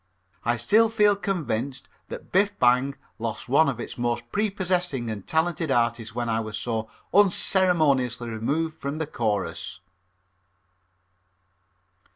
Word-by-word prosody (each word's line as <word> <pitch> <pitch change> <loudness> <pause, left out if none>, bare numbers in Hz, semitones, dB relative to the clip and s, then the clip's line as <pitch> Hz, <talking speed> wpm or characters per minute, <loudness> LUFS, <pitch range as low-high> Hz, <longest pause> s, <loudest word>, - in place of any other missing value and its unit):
I 120 +1 +1
still 215 - +4
feel 210 -2 +4
convinced 140 - -3 0.2
that - - -9
Biff 200 +2 +2
Bang 125 +3 +3 0.2
lost 110 -3 -4
one 140 +4 +4
of 125 -4 -4
its 120 - -7
most 120 0 -2
prepossessing 180 - -1
and 100 -3 -7
talented 160 0 0
artists 115 -3 0
when 120 -1 -2
I 115 -1 +1
was 110 -1 -4
so 110 -2 -3 0.2
unceremoniously 165 - +3
removed 150 +9 -2
from 140 +2 -4
the 160 - -2
chorus. 100 - -3
135 Hz, 125 wpm, -25 LUFS, 115-175 Hz, 0.2 s, still